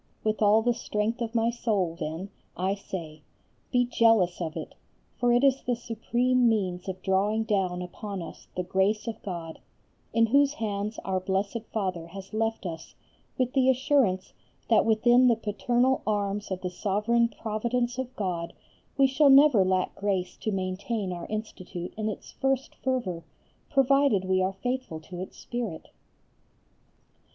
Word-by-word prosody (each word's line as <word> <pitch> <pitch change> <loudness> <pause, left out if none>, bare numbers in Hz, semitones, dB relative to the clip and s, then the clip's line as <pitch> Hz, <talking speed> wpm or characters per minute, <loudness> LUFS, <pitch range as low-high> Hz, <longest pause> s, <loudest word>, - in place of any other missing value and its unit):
With 215 0 0
all 215 +1 +5
the 240 +1 +3
strength 225 +1 -2
of 230 0 -3
my 230 0 +3
soul 205 -8 0
then 170 +4 -5 0.3
I 190 +2 +1
say: 165 -6 -7 0.5
Be 245 0 +3
jealous 225 -7 +3
of 160 -2 -3
it, - - -6 0.5
for 245 0 +3
it 240 +2 +4
is 270 -1 +4
the 245 - 0
supreme 240 +2 +1
means 190 -4 -1
of 185 0 -6
drawing 205 +3 +2
down 190 -5 0
upon 200 +2 -6
us - - -11
the 180 - -1
grace 190 +4 +1
of 225 -1 -5
God, 170 -5 -6 0.5
in 230 0 +4
whose 280 +4 +4
hands 210 -3 -3
Our 190 -1 0
Blessed 195 +4 -1
Father 185 -6 -2
has 195 +3 -10
left 225 -1 -1
us 165 -2 -7 0.4
with 255 -2 0
the 265 -1 +4
assurance 255 -7 +2 0.4
that 225 - +5
within 240 +3 +5
the 235 - +5
paternal 240 +4 +1
Arms 205 -1 -1
of 190 -1 -3
the 180 - -3
sovereign 215 +5 +1
Providence 240 +3 -2
of 260 0 -4
God 175 -4 -3 0.4
we 275 - +6
shall 275 +2 +4
never 270 -6 +7
lack 185 0 +1
grace 190 -3 -2
to 215 - -2
maintain 190 +1 -2
our 175 -1 -6
Institute 185 -5 -6
in 215 0 -2
its 210 - -7
first 270 0 -1
fervour, 220 -11 -2 0.5
provided 275 -7 +3
we 185 0 +2
are 190 +1 0
faithful 245 -4 -3
to 175 +2 -9
its 185 - -7
spirit. 230 -9 -5
215 Hz, 160 wpm, -27 LUFS, 185-240 Hz, 0.5 s, never